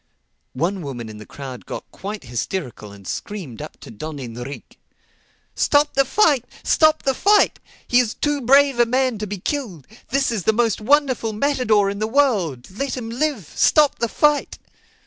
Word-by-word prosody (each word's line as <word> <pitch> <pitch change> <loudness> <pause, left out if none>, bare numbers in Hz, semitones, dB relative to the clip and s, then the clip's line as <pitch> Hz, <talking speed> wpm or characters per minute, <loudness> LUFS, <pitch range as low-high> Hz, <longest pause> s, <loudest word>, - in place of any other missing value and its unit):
One 180 +8 -1
woman 125 -7 -6
in 105 -1 -10
the 110 - -11
crowd 130 -3 -9
got - - -5
quite 205 +2 -7
hysterical 120 - -5
and 100 -2 -13
screamed 180 - -6
up - - -9
to - - -10
Don 150 +8 -7
Enrique, 125 +1 -8 0.8
"Stop 290 0 +2
the 275 0 +3
fight! 290 - +3 0.2
Stop 310 -1 +3
the 270 - +2
fight! 410 +9 +3 0.3
He 245 - +4
is 235 -3 0
too 295 -1 -1
brave 275 +1 +4
a 240 - +5
man 255 -2 +1
to 210 - -3
be 205 +1 -4
killed. 195 - -4 0.2
This 270 0 +1
is 220 -4 -1
the 220 - +4
most 230 -2 +1
wonderful 255 -2 +2
matador 215 -4 +2
in 200 - -6
the 215 - 0
world. 215 - +1
Let 265 +7 -3
him 230 -2 -5
live! 245 - -2
Stop 300 -2 +4
the 235 - 0
fight!" 295 +3 +1
225 Hz, 175 wpm, -21 LUFS, -, 0.8 s, a